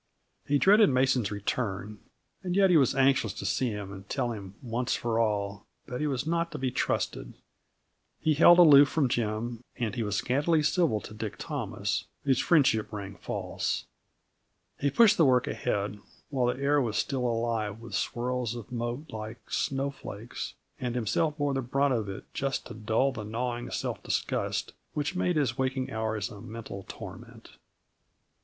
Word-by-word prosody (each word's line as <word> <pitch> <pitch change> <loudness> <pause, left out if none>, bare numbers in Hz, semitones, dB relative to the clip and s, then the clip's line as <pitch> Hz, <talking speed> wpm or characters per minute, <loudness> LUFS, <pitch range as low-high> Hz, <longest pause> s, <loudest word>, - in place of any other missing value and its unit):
He 145 - +3
dreaded 205 +6 +6
Mason's 130 -4 +2
return, 105 0 -3 0.4
and 180 -2 -2
yet 195 -1 +5
he - - +5
was 135 -3 +3
anxious 135 -6 +3
to - - -6
see 125 +6 +1
him 105 -2 -5
and 95 +1 -11
tell 120 - -1
him, 100 -3 -7
once 120 +1 -1
for 115 -1 -1
all, 100 -2 -1 0.2
that 125 +2 -5
he 150 - +1
was 135 -1 -1
not 170 +1 0
to - - -3
be 130 -1 -1
trusted. - - -2 0.8
He 155 - +2
held 170 +3 +7
aloof 145 -5 +8
from 140 -3 +1
Jim 115 +1 -2
and 115 -3 -2
he 120 - -2
was 105 -2 -1
scantily 150 - +2
civil 150 - +2
to - - -10
Dick 110 -1 -5
Thomas, - - -3 0.2
whose 135 -3 +2
friendship 135 -10 +3
rang 100 -2 -6
false. - - -3 0.9
He 140 - +2
pushed 215 - +5
the 165 - +6
work 125 -2 +4
ahead 105 -2 -2 0.3
while 130 -3 +1
the 125 - -7
air 145 +1 +3
was 115 -4 -1
still 130 -3 0
alive 115 -2 -1
with 115 -2 -10
swirls 120 +2 -1
of 120 +1 -8
mote 120 +5 -4
like 110 +1 -8
snowflakes, 135 -5 -3 0.2
and 125 -1 -2
himself 150 +7 0
bore 145 -2 0
the 135 - 0
brunt 135 +2 +1
of 110 -4 -1
it 95 - -6
just 135 0 -2
to - - -8
dull 110 +5 +1
that 110 -4 -6
gnawing 120 +2 -3
self - - -3
disgust - - -1 0.2
which 150 +4 -1
made 180 -1 +1
his 135 -4 0
waking 130 0 -1
hours 110 -2 -2
a 100 - -10
mental 110 -4 -8
torment. - - -10
120 Hz, 170 wpm, -29 LUFS, 110-140 Hz, 0.9 s, aloof